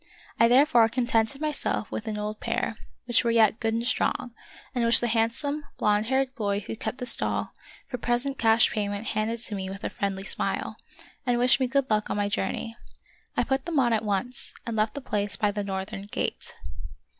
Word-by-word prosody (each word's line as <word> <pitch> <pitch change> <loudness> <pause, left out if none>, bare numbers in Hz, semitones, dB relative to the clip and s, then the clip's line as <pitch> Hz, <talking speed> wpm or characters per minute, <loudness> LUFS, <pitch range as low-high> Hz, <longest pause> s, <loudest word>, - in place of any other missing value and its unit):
I 230 - +7
therefore 240 -2 +5
con 240 +1 0
tented 230 +2 +1
myself 300 -7 -1
with 225 - -4
an 215 -1 -2
old 210 +1 -4
pair 225 - -1 0.3
which 240 0 +2
were 235 - +1
yet 225 -1 +4
good 225 -1 0
and 230 +1 -1
strong, 245 -1 0 0.4
and 245 -2 0
which 230 0 +5
the - - 0
handsome, 240 +6 0
blond 210 +1 +2
haired 265 +1 +1
boy 205 -5 -1
who 210 - -6
kept 220 +2 -4
the 250 - -4
stall, 240 - +1 0.3
for 250 -2 -5
present 245 +4 -1
cash 225 0 +5
payment 205 -1 -2
handed 225 +2 -1
to 220 - 0
me 190 -1 -3
with 195 +1 -8
a - - -2
friendly 195 -1 -2
smile, - - -2 0.5
and 245 -1 +1
wished 250 +2 +5
me 260 - +2
good 270 +1 +1
luck 215 0 +1
on - - -1
my 205 0 +1
journey. 225 +1 -2 0.6
I - - +4
put 265 0 -1
them 335 -3 -1
on 240 -4 +4
at 220 - +1
once, 210 +4 -1
and 230 -2 -3
left 215 +3 +1
the 285 - -4
place 205 -5 -1
by 210 -1 +1
the 205 0 -3
northern 195 0 -4
gate. - - -3
225 Hz, 205 wpm, -27 LUFS, 210-250 Hz, 0.6 s, I